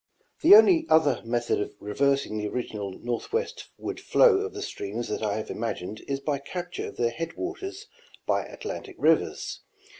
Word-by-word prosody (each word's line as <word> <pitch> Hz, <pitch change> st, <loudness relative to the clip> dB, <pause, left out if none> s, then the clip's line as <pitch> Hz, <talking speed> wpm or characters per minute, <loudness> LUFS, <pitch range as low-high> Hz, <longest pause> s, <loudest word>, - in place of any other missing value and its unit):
The 380 Hz, +5 st, +10 dB
only 360 Hz, -7 st, +6 dB
other 160 Hz, -2 st, +4 dB
method 120 Hz, 0 st, 0 dB
of 105 Hz, -, -5 dB
reversing 135 Hz, +3 st, 0 dB
the 105 Hz, -, -2 dB
original 105 Hz, -3 st, -4 dB
northwest 260 Hz, -, -3 dB
ward -, -, -5 dB
flow 470 Hz, -5 st, +5 dB
of 420 Hz, +1 st, -3 dB
the 410 Hz, -, -4 dB
streams 110 Hz, -, -5 dB
that -, -, -2 dB
I 105 Hz, -1 st, 0 dB
have 110 Hz, -, -4 dB
imagined 110 Hz, -2 st, -4 dB
is 140 Hz, 0 st, -1 dB
by 140 Hz, 0 st, -1 dB
capture 175 Hz, +5 st, -5 dB
of -, -, -10 dB
their 120 Hz, -1 st, +1 dB
headwaters 370 Hz, -, -5 dB, 0.4 s
by -, -, +1 dB
Atlantic -, -, -7 dB
rivers. -, -, +1 dB
140 Hz, 160 wpm, -27 LUFS, -, 0.4 s, The